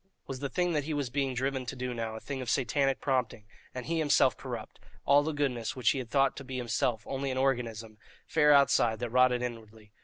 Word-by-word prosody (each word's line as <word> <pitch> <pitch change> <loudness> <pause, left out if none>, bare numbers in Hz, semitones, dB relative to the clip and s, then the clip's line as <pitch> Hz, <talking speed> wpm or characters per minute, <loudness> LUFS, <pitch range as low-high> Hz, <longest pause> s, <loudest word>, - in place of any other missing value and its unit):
Was 135 -1 -6
the 140 0 -3
thing 175 +1 0
that 150 -2 0
he 155 0 -2
was 140 -4 -2
being 135 -2 -1
driven 130 +1 -1
to 120 - -4
do 125 -1 -4
now 115 -2 -4
a - - -6
thing 135 +2 -5
of 125 - -4
satanic 135 +2 +1
prompting, 125 -6 -1 0.3
and 125 -1 -6
he 165 0 -1
himself 145 -5 +3
corrupt - - -7 0.3
all 140 +1 +6
the 155 +2 -2
goodness 130 -6 -2
which 125 -4 +2
he 135 - -2
had 125 -3 -6
thought 135 +1 +2
to 135 - -6
be 130 -1 -6
himself 120 -2 -1
only 135 0 -3
an 130 - -2
organism, 115 -5 -1 0.3
fair 150 -2 +3
outside, 140 -5 +4
that 120 -1 -4
rotted 125 0 +3
inwardly? 110 -3 -8
130 Hz, 225 wpm, -30 LUFS, 120-140 Hz, 0.3 s, all